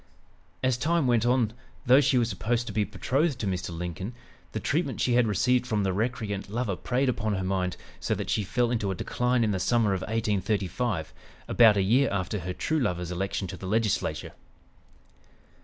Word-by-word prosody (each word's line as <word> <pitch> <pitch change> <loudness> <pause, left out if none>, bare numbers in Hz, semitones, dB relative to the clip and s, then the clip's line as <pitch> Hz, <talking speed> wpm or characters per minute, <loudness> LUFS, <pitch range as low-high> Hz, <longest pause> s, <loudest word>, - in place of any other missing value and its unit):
As 130 -2 +2
time 165 +3 +1
went 120 -2 +3
on, 120 -3 +2 0.3
though 130 +3 +7
she 135 -1 +3
was 120 -2 +3
supposed 120 +1 -1
to 105 - -6
be 105 0 +2
betrothed 140 +7 0
to - - -3
Mr. 95 -1 -2
Lincoln, 90 +6 -5 0.4
the - - -3
treatment - - -1
she 125 - +2
had 120 -1 +4
received 125 +4 +2
from 105 -3 0
the 95 -1 0
recreant 105 -2 -2
lover 110 -2 -1
preyed 130 +7 0
upon 110 -4 0
her 95 - -2
mind 95 -1 -1 0.2
so - - -1
that - - -4
she 105 - +1
fell 120 +5 0
into 110 -5 0
a 95 - -1
decline 125 +5 0
in 110 - +1
the 95 - -1
summer 115 -1 +2
of 95 - -2
1835, 105 -2 -1 0.3
about 110 -3 +6
a 100 - +3
year 125 +8 +3
after 100 +2 -2
her 90 +1 -4
true 155 +11 -1
lover's 90 - -1
election 95 +2 -2
to 95 - -7
the 95 - -7
Legislature. 110 +1 0
110 Hz, 190 wpm, -27 LUFS, 95-125 Hz, 0.4 s, though